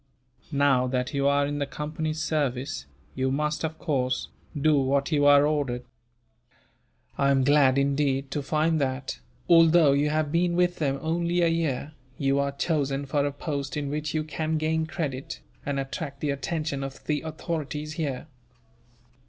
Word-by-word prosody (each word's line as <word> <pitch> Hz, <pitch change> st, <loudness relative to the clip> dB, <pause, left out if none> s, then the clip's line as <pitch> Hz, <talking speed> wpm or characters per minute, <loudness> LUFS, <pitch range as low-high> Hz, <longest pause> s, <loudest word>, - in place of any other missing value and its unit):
Now 140 Hz, -3 st, +3 dB
that 125 Hz, 0 st, -1 dB
you 140 Hz, 0 st, +1 dB
are 140 Hz, 0 st, +3 dB
in 145 Hz, 0 st, -3 dB
the 140 Hz, -, -1 dB
Company's 155 Hz, +2 st, -3 dB
service, 135 Hz, -, -2 dB, 0.3 s
you 130 Hz, 0 st, 0 dB
must, 150 Hz, +3 st, -1 dB
of 160 Hz, 0 st, -3 dB
course, 130 Hz, -6 st, -1 dB, 0.3 s
do 155 Hz, +1 st, +4 dB
what 140 Hz, +1 st, +1 dB
you 145 Hz, -2 st, +3 dB
are 145 Hz, 0 st, +7 dB
ordered. 140 Hz, -5 st, -1 dB, 1.3 s
I 140 Hz, -1 st, +3 dB
am 135 Hz, -1 st, +3 dB
glad, 140 Hz, -1 st, +4 dB
indeed, 140 Hz, -1 st, +1 dB
to 145 Hz, -, -1 dB
find 155 Hz, +2 st, +1 dB
that, 130 Hz, 0 st, -2 dB, 0.3 s
although 165 Hz, -2 st, +6 dB
you 145 Hz, +2 st, +2 dB
have 155 Hz, -1 st, 0 dB
been 170 Hz, +1 st, +2 dB
with 180 Hz, 0 st, +2 dB
them 140 Hz, -3 st, 0 dB
only 170 Hz, +2 st, 0 dB
a 170 Hz, -, +4 dB
year, 155 Hz, -3 st, -1 dB, 0.3 s
you 140 Hz, 0 st, +1 dB
are 140 Hz, 0 st, 0 dB
chosen 140 Hz, -2 st, -1 dB
for 140 Hz, +1 st, 0 dB
a -, -, -2 dB
post 140 Hz, -1 st, -4 dB
in 145 Hz, -1 st, -2 dB
which 150 Hz, +1 st, -3 dB
you 155 Hz, -, +1 dB
can 155 Hz, +1 st, -2 dB
gain 160 Hz, +1 st, 0 dB
credit, 140 Hz, -5 st, -4 dB, 0.3 s
and 140 Hz, -1 st, 0 dB
attract 135 Hz, +1 st, -5 dB
the 145 Hz, 0 st, 0 dB
attention 140 Hz, 0 st, -2 dB
of 135 Hz, 0 st, -8 dB
the 150 Hz, -1 st, 0 dB
authorities 155 Hz, -1 st, -4 dB
here." 145 Hz, -6 st, -3 dB
145 Hz, 165 wpm, -26 LUFS, 140-155 Hz, 1.3 s, are